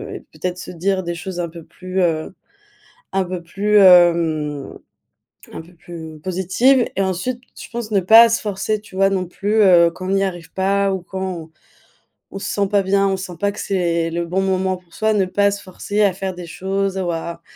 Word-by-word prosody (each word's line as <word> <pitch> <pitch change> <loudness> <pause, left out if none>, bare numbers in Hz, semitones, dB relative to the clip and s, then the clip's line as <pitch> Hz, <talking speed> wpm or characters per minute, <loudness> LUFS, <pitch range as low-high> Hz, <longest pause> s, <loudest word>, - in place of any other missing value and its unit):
et - - -6
peut-être 180 0 -4
se - - -8
dire 190 +2 -1
des 170 0 -4
choses 180 +1 -6
un 170 - -3
peu 165 0 -11
plus, 185 +3 -4
heu 165 -1 0 0.8
un 190 -1 +1
peu 180 -1 -5
plus 205 +5 +1
hem 170 -6 +4 0.8
un - - -6
peu 175 +2 -18
plus 160 -2 -10
positives. 190 +9 +2
Et 195 - 0
ensuite, 190 +7 -2 0.2
je - - -9
pense 235 -2 -6
ne 200 - +3
pas 225 +5 +8
se 230 - 0
forcer, 210 +1 -2
tu 210 - -15
vois, 195 +1 +3
non 185 -1 0
plus, 205 +4 -2
heu, 170 -3 +6
quand 185 +2 -7
on - - +2
y 195 - +2
arrive 175 -3 -5
pas 195 +1 +1
ou 190 - -3
quand 190 +2 -6
on 175 -4 -5 0.8
on 195 - -6
se - - -4
sent 200 -1 0
pas 205 0 +3
bien. 195 +1 +2
On 195 - +1
sent 185 -2 -7
pas 200 0 +1
que 205 - -10
c'est 170 -3 0
le 170 +1 -2
bon 180 +3 -1
moment 190 -1 0
pour 180 -2 -24
soi, 220 0 +1
ne 200 -3 +2
pas 200 +2 +2
se 200 0 -5
forcer 200 +2 -3
à 200 -2 +3
faire 190 0 -4
des 175 -1 -8
choses 195 +2 -2
ou 180 -2 -1
à 170 +1 -5
190 Hz, 220 wpm, -20 LUFS, 175-195 Hz, 0.8 s, pas